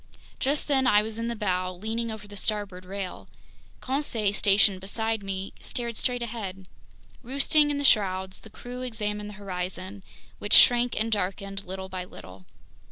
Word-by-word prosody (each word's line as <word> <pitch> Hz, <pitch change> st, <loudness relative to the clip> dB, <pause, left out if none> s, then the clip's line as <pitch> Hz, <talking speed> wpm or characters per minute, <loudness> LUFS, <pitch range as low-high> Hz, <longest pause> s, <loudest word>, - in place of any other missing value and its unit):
Just 285 Hz, +3 st, +1 dB
then 265 Hz, -3 st, +3 dB
I 210 Hz, -3 st, +5 dB
was 220 Hz, +1 st, -5 dB
in 230 Hz, -, -1 dB
the 235 Hz, -, -2 dB
bow, 185 Hz, -4 st, 0 dB
leaning 220 Hz, +5 st, -3 dB
over 220 Hz, -1 st, -7 dB
the 205 Hz, -, -10 dB
starboard 200 Hz, -3 st, -2 dB
rail. 195 Hz, 0 st, -6 dB, 0.5 s
Conseil, 245 Hz, -7 st, 0 dB
stationed 200 Hz, -2 st, +5 dB
beside 220 Hz, +3 st, -1 dB
me, 195 Hz, 0 st, -4 dB
stared 235 Hz, -2 st, -4 dB
straight 245 Hz, +1 st, 0 dB
ahead. 195 Hz, -5 st, -5 dB, 0.5 s
Roosting 280 Hz, +4 st, +3 dB
in 290 Hz, -, 0 dB
the 285 Hz, -, -1 dB
shrouds, 190 Hz, -6 st, +3 dB
the 220 Hz, -, -13 dB
crew 245 Hz, +3 st, -8 dB
examined 210 Hz, -4 st, -3 dB
the 210 Hz, -, -9 dB
horizon, 185 Hz, 0 st, -5 dB, 0.4 s
which 205 Hz, -, -1 dB
shrank 245 Hz, 0 st, +6 dB
and 225 Hz, +1 st, 0 dB
darkened 195 Hz, 0 st, -2 dB
little 190 Hz, +1 st, -5 dB
by 185 Hz, -1 st, -5 dB
little. 95 Hz, -, -12 dB
210 Hz, 165 wpm, -27 LUFS, 190-235 Hz, 0.5 s, shrank